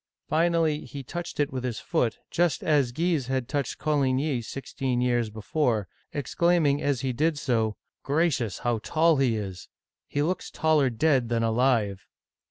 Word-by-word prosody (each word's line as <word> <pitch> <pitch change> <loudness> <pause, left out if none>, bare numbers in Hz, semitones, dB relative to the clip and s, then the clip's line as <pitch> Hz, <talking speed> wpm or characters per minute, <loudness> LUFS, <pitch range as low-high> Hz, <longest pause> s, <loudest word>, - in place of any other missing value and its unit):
Finally 165 -1 +2
he 140 +2 -7
touched 170 +5 -6
it 145 -2 +1
with 130 -1 -3
his 120 -3 -2
foot, 125 -10 0
just 175 -4 +1
as 145 -6 +2
Guise 160 -1 0
had 130 -2 -1
touched 140 0 -2
Coligny 140 -2 +1
sixteen 130 +1 -3
years 120 -2 +1
before 110 - -1 0.2
(see - - -7
p. 145 - -1
263), 165 -1 +2
exclaiming - - -7
as 140 -4 0
he 130 -1 -1
did 155 +5 +1
so: 115 -6 0
" - - -63
Gracious, 140 - +1
how 120 -2 +1
tall 160 +6 +2
he 130 -4 +2
is 95 -4 -6
I - - -66 0.3
He 145 - -1
looks 180 +4 -2
taller 155 -4 +2
dead 130 0 +2
than 115 -1 +1
alive 115 -4 +1
135 Hz, 180 wpm, -26 LUFS, 120-155 Hz, 0.3 s, Finally